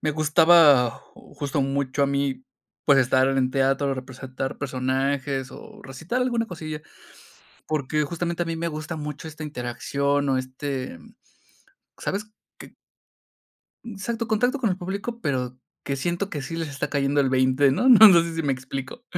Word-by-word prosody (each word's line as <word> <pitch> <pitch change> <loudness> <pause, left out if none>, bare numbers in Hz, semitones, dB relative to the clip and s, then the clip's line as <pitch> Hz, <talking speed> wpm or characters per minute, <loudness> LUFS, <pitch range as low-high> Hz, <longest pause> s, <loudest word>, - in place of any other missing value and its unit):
me 155 - 0
gustaba 150 -4 +5 0.2
justo, 145 0 -4
mucho 135 0 -1
a - - +4
mí, 140 - -1 0.4
pues 140 -2 +5
estar 130 0 +3
en 135 -1 +1
teatro, 135 +1 +1
representar 130 0 -6
personajes 135 0 -2
o 220 -2 -12
recitar 160 - -4
alguna 235 -2 0
cosilla. 155 -5 -7 0.9
Porque 150 0 -1
justamente 170 +3 -2
a - - -11
mí 165 0 -3
me 170 +1 -2
gusta 155 +1 -5
mucho 150 0 -6
esta 155 0 -9
interacción 140 +1 -2
o 135 - +2
este, 130 - -5 1.0
¿sabes 210 +2 -4 0.3
que? - - -13 1.1
Exacto, 230 +1 -4
contacto 245 +5 +1
con 230 -5 +1
el 185 - -1
público, 200 +6 -5
pero 125 - -2 0.3
que 140 - -2
siento 175 +8 -2
que 150 - -4
sí 165 +5 -6
les 165 -2 -3
está 145 -1 -4
cayendo 140 0 +1
el 135 - +1
20, 130 +1 +3
¿no?, 195 - +1
no 220 -3 +10
sé 170 0 -5
si 165 - -1
me 140 - +1
explico. 130 - -7
145 Hz, 155 wpm, -24 LUFS, 135-170 Hz, 1.1 s, no